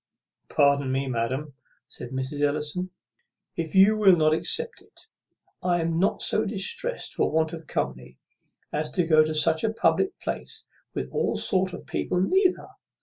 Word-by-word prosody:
"Pardon 140 -2 +2
me, 135 +1 0
madam," 130 +4 -2 0.3
said 120 - -8
Mrs. 130 +3 -4
Ellison; 150 +5 -1 0.7
"if 165 +2 -4
you 195 +3 +6
will 200 -4 +6
not 155 -2 +3
accept 160 - -1
of - - -21
it, - - -19 0.6
I 175 -1 +1
am 165 0 -1
not 195 +3 +1
so 215 - +2
distressed 225 - -2
for - - +1
want 160 +1 +1
of 165 -2 -8
company 65 0 -4 0.6
as 150 +1 -1
to 180 -3 +1
go 155 -1 +5
to 155 0 -3
such 160 +1 +3
a 220 - +1
public 240 - +1
place - - -5 0.3
with - - -4
all - - 0
sort 185 -1 +1
of - - -9
people 180 - -2
neither. 370 - +2
160 Hz, 165 wpm, -25 LUFS, 145-190 Hz, 0.7 s, you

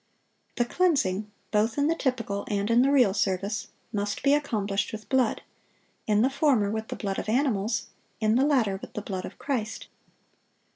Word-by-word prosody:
The 240 - +1
cleansing, 225 - +1 0.2
both 220 +3 +1
in 285 - +2
the 320 - +3
typical 230 -9 -2
and 205 +1 0
in 235 +1 +5
the 270 - +4
real 250 -9 +5
service, 200 +1 -1 0.3
must 205 0 -2
be 280 +1 +5
accomplished 210 -9 0
with 215 -1 -8
blood: 260 -4 +1 0.6
in 210 0 +3
the 260 - +4
former, 265 -8 +2
with 220 0 -3
the - - -5
blood 195 -2 -3
of - - -4
animals; 230 -3 +1 0.3
in 215 -1 +2
the 260 - +4
latter, 250 -10 +2
with - - -11
the 210 - -5
blood 190 -3 -4
of - - -9
Christ. 235 -6 -3
220 Hz, 180 wpm, -27 LUFS, 205-265 Hz, 0.6 s, in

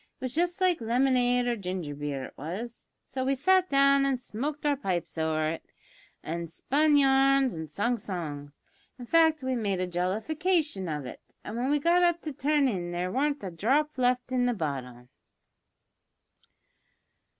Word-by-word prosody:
It - - -46
was 255 - -4
just 350 +3 0
like 365 -6 +2
lemonade 245 +1 +2
or 240 -1 0
ginger 180 -7 -4
beer, 145 -2 -4
it - - -12
was. 200 - -7 0.2
So 260 -1 -4
we 270 +1 +1
sat 370 +7 +3
down 275 0 +4
an' 275 -1 +1
smoked 275 +5 -5
our 290 -1 +3
pipes 185 -10 -3
over 160 -1 0
it, 165 - -6 0.6
an' 170 +1 -4
spun 290 - +2
yarns 270 -1 +4
an' 160 -1 -6
sung 225 - -1
songs; 150 -7 -6 0.4
in 245 - -8
fact 320 0 +3
we 260 0 -1
made 200 -5 -1
a 185 - 0
jollification 215 - -1
of 150 -3 -3
it, - - -9 0.2
an' 215 - -6
when 245 +3 -1
we 295 - +3
got 340 +4 +3
up 345 -1 +3
to 305 - -4
turn 290 +1 +2
in 180 -7 -2
there 175 +1 -2
warn't 285 +1 0
a 190 - -4
dhrop 275 - +1
left 250 0 +1
i' 255 -1 +1
the 245 -1 +1
bottle. 125 - -5
245 Hz, 170 wpm, -28 LUFS, 175-285 Hz, 0.6 s, down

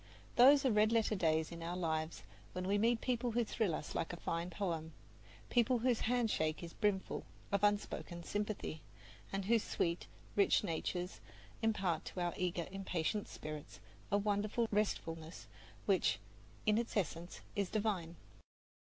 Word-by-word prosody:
Those 275 +3 +8
are 260 - +5
red 215 +1 +4
letter 225 -1 +3
days 160 -4 +2
in 170 0 -7
our 170 +2 -3
lives 160 - -1 0.3
when 180 0 -3
we 205 +1 +3
meet 230 +1 +3
people 245 -1 0
who 240 +1 +3
thrill 215 -6 0
us 150 - -5
like 165 - -1
a 175 - -5
fine 170 +1 -2
poem, 165 -4 -2 0.6
people 245 +1 +4
whose 240 0 +2
handshake 215 -11 +1
is 170 - -7
brimful 205 -3 0 0.3
of 200 0 +1
unspoken 205 -4 0
sympathy, 205 -5 -3 0.5
and 195 -1 -2
whose 230 +2 +4
sweet, 170 +1 -1 0.3
rich 200 +1 +4
natures 180 0 -2 0.4
impart 195 -7 +1
to - - -5
our 175 -1 0
eager, 180 -2 -1
impatient 195 +1 -1
spirits 150 -11 -7 0.3
a 200 - +5
wonderful 210 +3 +1
restfulness 165 -6 -1 0.4
which, - - +3 0.5
in 215 +1 +4
its 235 -2 -2
essence, 175 -2 -2
is 200 -2 0
divine. 200 -6 -1
195 Hz, 150 wpm, -36 LUFS, 170-215 Hz, 0.6 s, Those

